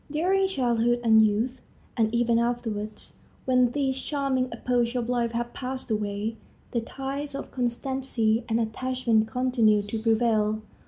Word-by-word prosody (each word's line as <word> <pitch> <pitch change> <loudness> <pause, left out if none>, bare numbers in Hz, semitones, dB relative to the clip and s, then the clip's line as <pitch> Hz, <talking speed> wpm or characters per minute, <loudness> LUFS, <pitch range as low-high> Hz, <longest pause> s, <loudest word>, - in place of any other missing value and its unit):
During 370 +6 +2
childhood 240 -7 +1
and 220 -1 +6
youth, 220 +5 +1 0.3
and 220 -2 +2
even 235 0 +2
afterwards, 225 -3 -3 0.3
when 255 -1 +4
these 265 -1 -1
charming 270 -3 -1
epochs 245 -1 0
of 240 -1 -1
life 240 -2 0
have 240 +1 -3
passed 255 -2 -5
away, 210 +1 -2 0.3
the 235 - 0
ties 275 +4 -5
of 275 - -6
constancy 245 -2 0
and 225 +1 +2
attachment 230 -1 0
continue 230 -4 +2
to 205 +2 -4
prevail. 220 -1 +2
240 Hz, 140 wpm, -26 LUFS, 220-260 Hz, 0.3 s, and